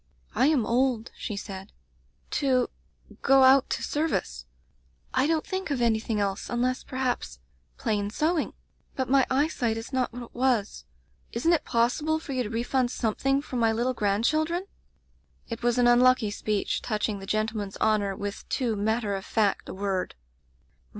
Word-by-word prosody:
"*I 265 Hz, -, +3 dB
am 290 Hz, -7 st, +3 dB
old/ 245 Hz, -1 st, +1 dB
she 210 Hz, -, -5 dB
said, 195 Hz, 0 st, -7 dB, 0.6 s
'to 260 Hz, -4 st, +1 dB, 0.2 s
— -, -, -22 dB
go 270 Hz, -1 st, +5 dB
out 265 Hz, +1 st, +6 dB
to -, -, -2 dB
ser 305 Hz, +2 st, 0 dB
vice. 65 Hz, -, -3 dB, 0.7 s
I 280 Hz, -, +3 dB
don't 320 Hz, -1 st, +1 dB
think 380 Hz, -2 st, -3 dB
of 280 Hz, -3 st, -1 dB
anything 225 Hz, -2 st, +1 dB
else, 200 Hz, -1 st, -2 dB
unless, 250 Hz, +2 st, 0 dB
perhaps 255 Hz, -, -2 dB, 0.2 s
— 65 Hz, -1 st, -40 dB
plain 205 Hz, -1 st, -1 dB
sewing. 310 Hz, +8 st, 0 dB, 0.4 s
But 260 Hz, -1 st, -2 dB
my 270 Hz, -2 st, +5 dB
eyesight 260 Hz, -5 st, +1 dB
is 225 Hz, +4 st, -7 dB
not 255 Hz, -1 st, 0 dB
what 245 Hz, +1 st, -7 dB
it 235 Hz, -, -13 dB
was. 240 Hz, -, 0 dB, 0.5 s
Isn't 325 Hz, +9 st, +2 dB
it 330 Hz, -, +1 dB
possible 250 Hz, +7 st, +1 dB
for 315 Hz, -3 st, -6 dB
you 255 Hz, -, 0 dB
to 220 Hz, -, -3 dB
refund 240 Hz, +2 st, 0 dB
something 270 Hz, +4 st, 0 dB
for 255 Hz, -, -5 dB
my 225 Hz, -1 st, +3 dB
little 240 Hz, +3 st, 0 dB
grand 210 Hz, -1 st, 0 dB
children?' 315 Hz, +6 st, +1 dB, 0.8 s
"It 230 Hz, 0 st, -6 dB
was 240 Hz, 0 st, +1 dB
an 245 Hz, -, +4 dB
unlucky 240 Hz, -2 st, +5 dB
speech, 210 Hz, 0 st, -1 dB
touching 215 Hz, -2 st, -2 dB
the 195 Hz, -, -9 dB
gentleman's 215 Hz, -2 st, -2 dB
honor 210 Hz, -3 st, +1 dB
with 200 Hz, 0 st, -6 dB
too 240 Hz, -5 st, 0 dB
matter 215 Hz, 0 st, 0 dB
of 195 Hz, -, -5 dB
fact 210 Hz, -2 st, 0 dB
a -, -, -5 dB
word. 195 Hz, -1 st, -2 dB
240 Hz, 170 wpm, -27 LUFS, 210-265 Hz, 0.8 s, out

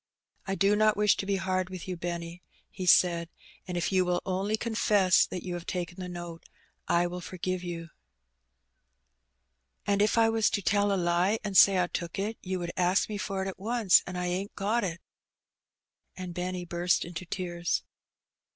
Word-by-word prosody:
"I 195 Hz, -, -1 dB
do 200 Hz, +1 st, +3 dB
not 215 Hz, 0 st, +3 dB
wish 210 Hz, 0 st, +4 dB
to 195 Hz, -, -4 dB
be 200 Hz, -, +1 dB
hard 185 Hz, -1 st, -1 dB
with 185 Hz, -1 st, -8 dB
you, 185 Hz, -, -3 dB
Benny," 170 Hz, 0 st, -5 dB, 0.3 s
he 185 Hz, -, -5 dB
said; 170 Hz, -2 st, +4 dB, 0.4 s
"and 180 Hz, -1 st, -3 dB
if 175 Hz, -, -1 dB
you 185 Hz, -1 st, +3 dB
will 180 Hz, 0 st, -1 dB
only 195 Hz, +3 st, -1 dB
confess 210 Hz, -5 st, +3 dB
that 180 Hz, -, -6 dB
you 180 Hz, -, -4 dB
have 175 Hz, -1 st, -6 dB
taken 175 Hz, 0 st, -4 dB
the 180 Hz, -1 st, -5 dB
note, 175 Hz, -1 st, -8 dB, 0.4 s
I 170 Hz, +1 st, +3 dB
will 180 Hz, +1 st, -4 dB
forgive 185 Hz, +1 st, -4 dB
you." 170 Hz, -2 st, -6 dB, 1.1 s
" 65 Hz, 0 st, -50 dB
And 200 Hz, 0 st, +2 dB
if 210 Hz, +2 st, +2 dB
I 225 Hz, -1 st, +5 dB
was 225 Hz, -1 st, +2 dB
to 200 Hz, -, -1 dB
tell 205 Hz, +1 st, +2 dB
a 195 Hz, -, +1 dB
lie 175 Hz, +4 st, +2 dB
and 205 Hz, -2 st, -4 dB
say 195 Hz, 0 st, +7 dB
I 180 Hz, -, +3 dB
took 170 Hz, -1 st, -5 dB
it, 210 Hz, +3 st, -3 dB
you 185 Hz, 0 st, -3 dB
would 175 Hz, -1 st, -4 dB
ask 185 Hz, +3 st, +2 dB
me 210 Hz, -1 st, -4 dB
for 195 Hz, -2 st, -2 dB
it -, -, -4 dB
at 190 Hz, -, -6 dB
once, 220 Hz, -2 st, +4 dB
and 180 Hz, 0 st, -5 dB
I 180 Hz, -, -2 dB
ain't 185 Hz, +3 st, -3 dB
got 215 Hz, +4 st, 0 dB
it." 170 Hz, -3 st, -3 dB, 1.2 s
And 180 Hz, -1 st, -6 dB
Benny 180 Hz, 0 st, -3 dB
burst 175 Hz, +1 st, 0 dB
into 175 Hz, +1 st, -6 dB
tears. 175 Hz, -2 st, -2 dB
185 Hz, 195 wpm, -29 LUFS, 175-200 Hz, 1.2 s, say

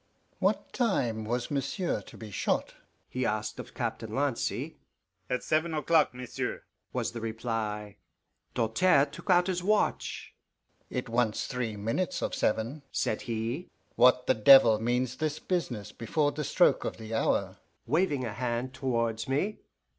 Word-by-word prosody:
"What -, -, 0 dB
time 120 Hz, -, 0 dB
was 120 Hz, +4 st, -2 dB
monsieur 140 Hz, -, -1 dB
to -, -, -14 dB
be 110 Hz, -2 st, -9 dB
shot?" -, -, -1 dB, 0.3 s
he 130 Hz, -, -3 dB
asked 110 Hz, -1 st, -2 dB
of -, -, -9 dB
Captain 115 Hz, -2 st, -3 dB
Lancy. 140 Hz, -3 st, -1 dB, 0.5 s
"At 125 Hz, 0 st, -1 dB
seven 160 Hz, +1 st, +1 dB
o'clock, 155 Hz, +1 st, +3 dB
monsieur," 125 Hz, -1 st, -4 dB, 0.3 s
was -, -, -1 dB
the 115 Hz, -1 st, -6 dB
reply. 110 Hz, -2 st, -3 dB, 0.6 s
Doltaire 140 Hz, +6 st, +4 dB
took 150 Hz, -, -12 dB
out 180 Hz, -1 st, +5 dB
his 180 Hz, -1 st, -1 dB
watch. 210 Hz, +3 st, 0 dB, 0.6 s
"It 125 Hz, +1 st, -3 dB
wants 115 Hz, -2 st, +1 dB
three 120 Hz, -5 st, -3 dB
minutes 115 Hz, -, -1 dB
of -, -, -2 dB
seven," 115 Hz, +7 st, 0 dB
said 110 Hz, -, -1 dB
he. 115 Hz, +9 st, -2 dB, 0.3 s
"What 125 Hz, +1 st, +5 dB
the -, -, +4 dB
devil 115 Hz, -1 st, +7 dB
means 125 Hz, +2 st, 0 dB
this 155 Hz, -1 st, -1 dB
business 125 Hz, -, -2 dB
before 145 Hz, +6 st, 0 dB
the 150 Hz, -, -4 dB
stroke -, -, +3 dB
o' -, -, 0 dB
the 110 Hz, 0 st, -9 dB
hour?" 110 Hz, -, 0 dB, 0.3 s
waving 150 Hz, -5 st, +1 dB
a 110 Hz, -, -4 dB
hand 120 Hz, +2 st, -2 dB
towards 115 Hz, -3 st, -1 dB
me. 190 Hz, +11 st, 0 dB
125 Hz, 145 wpm, -29 LUFS, 110-150 Hz, 0.6 s, devil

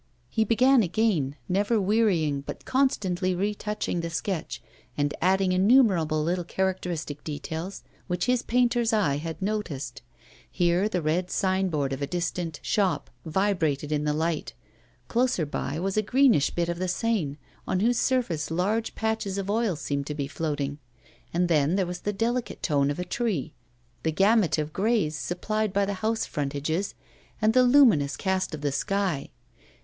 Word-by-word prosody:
He 220 Hz, -, +2 dB
began 250 Hz, +4 st, +4 dB
again, 180 Hz, -8 st, +1 dB
never 205 Hz, +4 st, +1 dB
wearying, 185 Hz, -9 st, +2 dB
but -, -, -8 dB
constantly 190 Hz, -9 st, +1 dB
retouching 205 Hz, -1 st, -2 dB
the 170 Hz, -, -3 dB
sketch, 170 Hz, +1 st, -3 dB, 0.4 s
and 145 Hz, 0 st, 0 dB
adding 190 Hz, +1 st, +3 dB
innumerable 185 Hz, -, +4 dB
little 175 Hz, +2 st, 0 dB
characteristic 175 Hz, -5 st, -3 dB
details 160 Hz, +5 st, -5 dB, 0.2 s
which 180 Hz, -1 st, -1 dB
his 250 Hz, -1 st, +2 dB
painter's 240 Hz, -1 st, +2 dB
eye 190 Hz, -10 st, +2 dB
had 160 Hz, +2 st, -5 dB
noticed; 170 Hz, -, -3 dB, 0.5 s
here 175 Hz, +3 st, +2 dB
the 180 Hz, -5 st, -1 dB
red 175 Hz, +4 st, 0 dB
signboard 185 Hz, -9 st, 0 dB
of 135 Hz, -, -5 dB
a 140 Hz, -, -1 dB
distant 175 Hz, -2 st, -3 dB
shop 195 Hz, -4 st, 0 dB, 0.2 s
vibrated 160 Hz, -5 st, 0 dB
in 150 Hz, -1 st, 0 dB
the 150 Hz, -, +1 dB
light; 160 Hz, +1 st, -2 dB, 0.5 s
closer 240 Hz, -8 st, +1 dB
by 145 Hz, +1 st, -3 dB
was 195 Hz, +3 st, -2 dB
a -, -, +5 dB
greenish 240 Hz, -, +4 dB
bit 170 Hz, -1 st, -1 dB
of 170 Hz, 0 st, -3 dB
the 185 Hz, -, -1 dB
Seine, 185 Hz, -7 st, -1 dB, 0.3 s
on 185 Hz, -, 0 dB
whose 240 Hz, +2 st, +2 dB
surface 230 Hz, -, 0 dB
large 200 Hz, +7 st, -1 dB
patches 220 Hz, -3 st, -1 dB
of 195 Hz, 0 st, -2 dB
oil 220 Hz, -4 st, +1 dB
seemed 140 Hz, -1 st, -3 dB
to 150 Hz, -, -4 dB
be 140 Hz, -2 st, -2 dB
floating; 145 Hz, 0 st, -3 dB, 0.5 s
and 175 Hz, +1 st, +1 dB
then 155 Hz, 0 st, +2 dB
there 195 Hz, -2 st, +1 dB
was 175 Hz, 0 st, -5 dB
the 205 Hz, -, -2 dB
delicate 235 Hz, +4 st, -2 dB
tone 140 Hz, -3 st, +2 dB
of 145 Hz, -, -2 dB
a 180 Hz, -, -3 dB
tree, 180 Hz, -, -2 dB, 0.5 s
the 160 Hz, -, 0 dB
gamut 195 Hz, -1 st, +3 dB
of 155 Hz, 0 st, -3 dB
greys 200 Hz, -7 st, +1 dB
supplied 215 Hz, +7 st, -2 dB
by 200 Hz, +1 st, +2 dB
the 200 Hz, -, -2 dB
house 220 Hz, +1 st, 0 dB
frontages, 145 Hz, +6 st, -2 dB, 0.4 s
and 215 Hz, 0 st, +3 dB
the 255 Hz, -, +6 dB
luminous 245 Hz, -, +5 dB
cast 190 Hz, -3 st, -1 dB
of 150 Hz, -, -10 dB
the 145 Hz, -1 st, 0 dB
sky. 190 Hz, -1 st, -1 dB
180 Hz, 160 wpm, -26 LUFS, 155-215 Hz, 0.5 s, the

